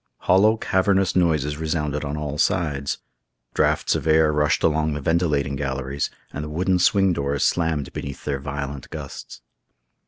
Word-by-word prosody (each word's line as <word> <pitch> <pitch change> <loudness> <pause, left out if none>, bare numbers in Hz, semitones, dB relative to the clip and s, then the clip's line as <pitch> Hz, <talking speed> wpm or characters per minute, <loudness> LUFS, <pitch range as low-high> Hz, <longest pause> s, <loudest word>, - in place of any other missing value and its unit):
Hollow, 105 +5 +4
cavernous 95 -2 +1
noises 75 -5 +1
resounded 75 -2 -2
on 75 +1 -3
all 75 -1 -4
sides. 70 -5 0 0.6
Draughts - - +2
of - - -2
air 80 -1 +4
rushed 75 0 +1
along 80 -1 +2
the - - -3
ventilating 75 -3 0
galleries, 70 0 -2 0.2
and 75 - -4
the 75 - -6
wooden 90 +4 +1
swing 95 +1 +3
doors 70 -2 -1
slammed 80 -5 0
beneath 70 0 -6
their 70 -2 -1
violent 70 -1 -5
gusts. - - -8
75 Hz, 150 wpm, -23 LUFS, 70-85 Hz, 0.6 s, Hollow